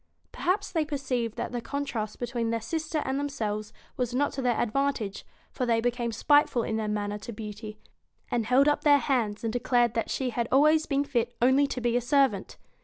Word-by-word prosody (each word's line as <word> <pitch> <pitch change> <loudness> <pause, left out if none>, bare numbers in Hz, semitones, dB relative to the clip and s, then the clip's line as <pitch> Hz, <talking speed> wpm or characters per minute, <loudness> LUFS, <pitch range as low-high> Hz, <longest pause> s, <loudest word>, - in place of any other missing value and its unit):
Perhaps 395 +3 -1
they 325 -3 +1
perceived 265 -6 -2
that - - -4
the 245 -1 -3
contrast 230 -4 -4
between 240 -1 -2
their 230 0 0
sister 315 +5 -2
and 265 +1 -1
themselves 215 -7 -3 0.3
was 245 -1 -1
not 285 +2 +1
to 270 - -4
their 245 -2 +1
advan 275 +6 +1
tage, 200 -4 -5 0.3
for 250 - -2
they 230 -1 +3
became 240 0 -1
spiteful 260 +1 +3
in 220 - -2
their 220 -1 -1
manner 210 0 -2
to 235 - -7
Beauty, 215 0 -7 0.5
and 230 -3 0
held 265 +3 +4
up 295 - +2
their 290 -1 +6
hands 235 -7 -1
and 225 -1 -1
declared 240 -1 +2
that 230 -2 -1
she 260 -2 -1
had 235 0 -1
always 305 +3 +4
been 280 -1 +1
fit 240 -4 -1
only 260 +4 +4
to 265 - -4
be 240 -1 0
a 245 - +2
servant. 255 -6 +1
245 Hz, 205 wpm, -27 LUFS, 225-280 Hz, 0.5 s, their